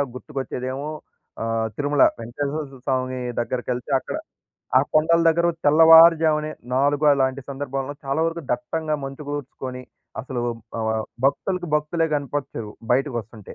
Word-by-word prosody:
గుర్తుకొచ్చేదేమో 135 0 -5 0.5
ఆహ్, 115 0 0
తిరుమల 145 -1 +3 0.2
వెంకటేశ్వర 140 +6 -3 0.2
స్వామి 130 -1 -1 0.2
దగ్గరకెళ్తే 125 +2 -3
అక్కడ - - -6 0.6
ఆ - - +5
కొండల 165 +2 +4
దగ్గర 170 +1 +3 0.2
తెల్లవారుజామునే 160 0 +7 0.2
4 145 +3 +2
అలాంటి 135 0 +1
సందర్భాల్లో 135 0 -4
చాలా 135 +4 -1
వరకు 165 0 -3
దట్టంగా 155 +3 -1
మంచుకూర్చుకొని 135 -2 -6 0.4
అసలు 125 0 -4 0.4
ఆహ్, 110 0 0 0.2
భక్తులకు 175 +5 0
భక్తులే 160 +2 0
కనపచ్చారు, 140 -6 -3 0.2
బయటకొస్తుంటే 120 -6 -3
140 Hz, 105 wpm, -23 LUFS, 130-155 Hz, 0.6 s, తెల్లవారుజామునే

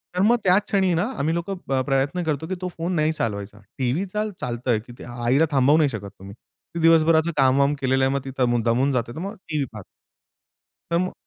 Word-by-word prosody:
तर 180 - +1
मग 235 +3 +5
त्याच 190 +2 +4
क्षणी 190 -3 +1
ना 170 +3 +1
आम्ही 155 +3 0
लोकं 185 +3 -3
प्र 135 -1 +1
प्रयत्न 140 +6 0
करतो 155 0 -2
की 185 - -3
तो 185 - -2
फोन 170 +3 -2
नाही 155 0 +2
चालवायचा. 105 -5 -4 0.2
टीव्ही 135 +9 0
चाल 210 0 -1
चालतंय, 120 -1 -1
की 120 +3 -13
ते - - -9
आईला 120 +5 +1
थांबवू 140 +2 +4
नाही 150 -3 +3
शकत 100 -4 -6
तुम्ही. 95 +1 -10 0.4
ती - - -2
दिवसभराचं 165 0 +4
कामवाम 140 +1 +4
केलेलं 130 0 +2
आहे, 135 - +1
मग 140 - 0
ती 135 - -5 0.3
दमून 125 +4 +2
जाते, 120 -2 -1
तर - - -6
मग 200 +5 -5
टीव्ही 150 -4 -1
पाहते. 105 -3 -9 1.1
तर 170 - +3
मग 185 +1 -1
145 Hz, 215 wpm, -23 LUFS, 125-170 Hz, 1.1 s, मग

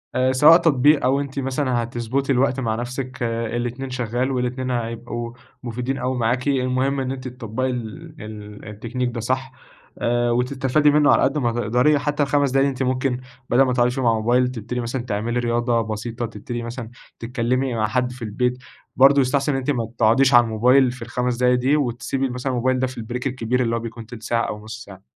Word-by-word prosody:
آآ، 130 0 +3
سواء 150 +5 +8
تطبيق 150 -3 +3
أو 135 +2 +3
أنتِ 140 -1 -4
مثلًا 130 -2 0
هتضبُطي 120 +4 -2
الوقت 130 +1 +2
مع 110 -3 -1
نفسِك، 125 +2 -5
الاتنين 120 +3 -3
شغال 125 +1 -2
والاتنين 125 0 -2
هيبقوا 120 0 -4 0.3
مفيدين 125 +3 -3
أوي 125 0 -2
معاكِ، 125 +3 0
المهم 130 0 +1
إن 130 0 -2
أنتِ 130 -1 -6
تطّبقي 125 0 -3
ال 135 +7 -6
ال 105 -1 -9
التكنيك 120 +4 -3
ده 115 - -4
صح، 130 +3 -2 0.5
آآ، 120 0 +1
وتستفادي 130 +4 +2
منه 150 0 +4
على - - +4
قد 135 +3 +1
ما 120 -4 +1
تقدري، 125 +6 +2
حتى 145 0 0
ال5 140 -1 +1
دقايق 135 +1 +3
دي 140 - +2
أنتِ 130 0 -3
ممكن 130 0 -1 0.3
بدل 125 +3 +4
ما 130 -2 +3
تقعدي 125 0 +2
فيهم 130 -1 -2
على 115 - +4
الموبايل 120 +3 +2
تبتدي 125 0 -5
مثلًا 120 +2 -3
تعملي 115 +1 -2
رياضة 120 0 +1
بسيطة، 115 +2 -4
تبتدي 115 +2 -6
مثلًا 115 0 -6 0.3
تتكلِّمي 125 +2 -1
مع 110 -1 +1
حد 125 +2 0
في 125 -1 -12
البيت، 125 +3 -1 0.4
برضه 140 +1 +6
يستحسن 135 +3 +1
إن 135 - 0
أنتِ 135 +2 -1
ما 115 -4 -2
تقعديش 130 +4 +4
على 120 0 +8
الموبايل 125 +3 +3
في 125 - -11
ال5 125 0 -2
دقايق 125 0 +3
دي، 135 +4 +2
وتسيبي 135 0 -1
مثلًا 125 +2 -3
الموبايل 130 +1 +1
ده 130 - +1
في 130 0 -10
البريك 125 +3 -4
الكبير 125 -1 -1
اللي 115 -1 0
هو 115 - -1
بيكون 115 0 -7
تِلت 115 -2 -11
ساعة 115 0 0
أو 105 0 -6
نُصّ 110 +1 -8
ساعة. 95 -1 -13
125 Hz, 200 wpm, -22 LUFS, 115-130 Hz, 0.5 s, سواء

